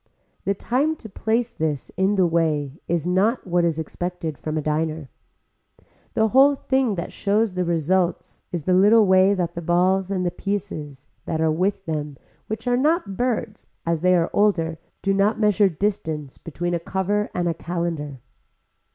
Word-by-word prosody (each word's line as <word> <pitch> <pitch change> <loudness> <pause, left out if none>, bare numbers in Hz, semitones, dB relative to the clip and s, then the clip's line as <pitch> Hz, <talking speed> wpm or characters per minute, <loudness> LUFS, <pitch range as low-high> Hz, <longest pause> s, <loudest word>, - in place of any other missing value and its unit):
The 200 - +1
time 275 +10 0
to 240 - -11
place 225 +4 -1
this 155 -3 -2
in 190 +2 +2
the 190 -2 +4
way 155 -4 0
is 170 -2 0
not 195 +7 +1
what 175 -1 +1
is 165 -2 +1
expected 165 0 -4
from 155 +2 -4
a - - 0
diner. 155 -2 -2 1.0
The 220 0 +3
whole 275 +4 +6
thing 265 -5 0
that 170 -1 -5
shows 210 0 +1
the 180 0 -1
result 170 +2 0
is 175 -4 -3
the 185 - +1
little 210 +4 +6
way 190 +1 +5
that 175 -3 -2
the 170 - -5
balls 180 +3 +2
and 185 -2 -1
the 175 - 0
pieces 175 -8 -5 0.2
that 160 - -2
are 160 -1 +2
with 190 +4 -1
them 150 -3 -4 0.3
which 220 +3 -5
are 245 0 +3
not 300 - +1
birds 230 -3 -2 0.2
as 165 -1 0
they 180 0 +4
are 170 -1 +1
older 165 -6 +1 0.2
do 195 - +2
not 200 +3 +2
measure 210 -2 +4
the 165 - -12
distance 160 -7 -2
between 175 +2 -4
a 170 - 0
cover 195 +4 -1
and 175 -1 0
a 170 - +1
calendar. 165 -6 -4
180 Hz, 175 wpm, -23 LUFS, 160-205 Hz, 1.0 s, whole